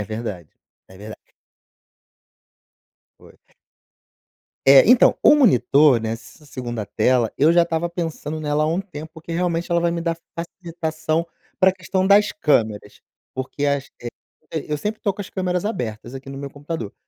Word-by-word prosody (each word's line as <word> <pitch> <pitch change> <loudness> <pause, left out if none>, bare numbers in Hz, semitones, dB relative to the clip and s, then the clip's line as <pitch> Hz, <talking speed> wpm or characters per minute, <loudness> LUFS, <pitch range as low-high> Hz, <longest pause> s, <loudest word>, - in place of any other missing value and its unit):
É - - -1
verdade, 105 -8 -6 0.4
é 95 - -16
verdade. 105 0 -11 1.9
Foi. - - -18 1.3
É, 135 0 +9
então, 250 0 +6
o - - +7
monitor 140 - +4
nessa 115 +7 -7
segunda 120 -5 -5
tela, 125 -1 +1
eu 150 +4 +5
já 170 0 +5
estava 170 0 -2
pensando 160 -3 -4
nela 150 0 0
há - - 0
um 170 +4 0
tempo, 160 -5 -9
porque 160 +1 -10
realmente 170 0 -1
ela 170 - +3
vai 170 0 +1
me 170 0 -3
dar 165 0 -2 0.2
facilitação 165 -2 -3 0.3
pra 190 0 +5
questão 185 0 -2
das 205 +1 +5
câmeras, 110 - 0 0.3
porque 130 +2 -3
as 140 -1 -1
vezes, 120 0 -6 0.4
eh, 160 - -3
eu 150 - 0
sempre 210 +8 -4
estou 200 -3 -1
com 205 - -7
as 195 - -9
câmeras 180 -2 -2
abertas 120 - -4
aqui 135 0 -9
no 135 - -7
meu 140 0 -6
computador, 145 -6 -6
155 Hz, 160 wpm, -21 LUFS, 130-175 Hz, 1.9 s, É